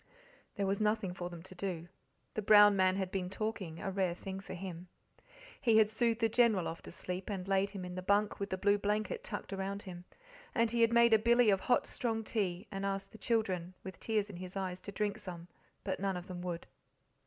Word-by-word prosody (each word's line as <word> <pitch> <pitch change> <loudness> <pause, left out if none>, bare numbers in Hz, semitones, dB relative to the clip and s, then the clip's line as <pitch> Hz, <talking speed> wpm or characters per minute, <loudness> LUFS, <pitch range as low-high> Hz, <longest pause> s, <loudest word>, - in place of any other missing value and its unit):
There 200 - 0
was 195 +2 0
nothing 210 -3 +1
for 175 -1 -5
them 170 -2 -9
to 190 - -11
do. 175 -2 -4 0.5
The 215 - -2
brown 205 0 +8
man 185 -1 +3
had 190 -1 -2
been 185 -2 -2
talking 195 -5 -4
a 195 - -3
rare 185 -3 0
thing 190 +1 -6
for 195 -1 -8
him. 180 -1 -7 0.7
He 230 -3 +4
had 215 -1 +5
soothed 230 +1 +1
the 225 - +5
General 225 -5 +3
off 165 - -5
to - - -10
sleep, 185 +2 -5
and 190 -2 -4
laid 195 0 +2
him 195 -2 -6
in 180 - -6
the 185 - -4
bunk 205 +3 +2
with 200 0 -3
the 190 - -2
blue 205 +2 +3
blanket 210 - -1
tucked - - -5
around 195 +1 -3
him. 180 -1 -9 0.5
And 230 -2 +3
he 235 0 +1
had 230 0 +5
made 235 -1 +6
a 220 - +7
billy 235 0 +5
of 195 - +3
hot 245 - +2
strong 225 -2 -2
tea, 195 -3 -1
and 195 -1 -4
asked 195 0 -2
the 220 - -13
children, 185 -6 0
with 190 - -8
tears 215 -2 0
in 200 -4 -9
his 185 +1 -8
eyes, 185 -1 -3
to 200 - -7
drink 205 +1 -1
some, 175 -2 -8 0.4
but 190 - -2
none 195 -1 -1
of 180 - -7
them 180 -1 -6
would. 175 -1 -4
195 Hz, 230 wpm, -33 LUFS, 185-215 Hz, 0.7 s, brown